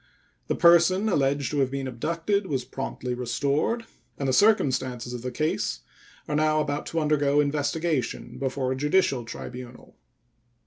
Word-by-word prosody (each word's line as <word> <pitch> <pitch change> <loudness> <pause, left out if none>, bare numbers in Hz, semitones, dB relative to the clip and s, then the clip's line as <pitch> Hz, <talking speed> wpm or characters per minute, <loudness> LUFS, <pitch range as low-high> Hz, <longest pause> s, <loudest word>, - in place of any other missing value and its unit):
The - - 0
person 175 +4 +5
alleged 140 -5 +1
to 145 - 0
have 135 -2 +2
been 135 0 -3
abducted 170 - -1
was 130 -5 -2
promptly 125 -1 -4
restored, 140 - -1 0.3
and 140 - -2
the 130 - +1
circumstances 130 - +2
of 120 - -5
the 125 - -3
case 155 +5 -1 0.5
are 150 - -2
now 155 0 +2
about 150 -1 -2
to 165 - -1
undergo 145 -2 +2
investigation 145 -1 -1
before 135 -1 -1
a - - 0
judicial 145 -3 +1
tribunal. 125 +1 -9
145 Hz, 145 wpm, -26 LUFS, 130-155 Hz, 0.5 s, person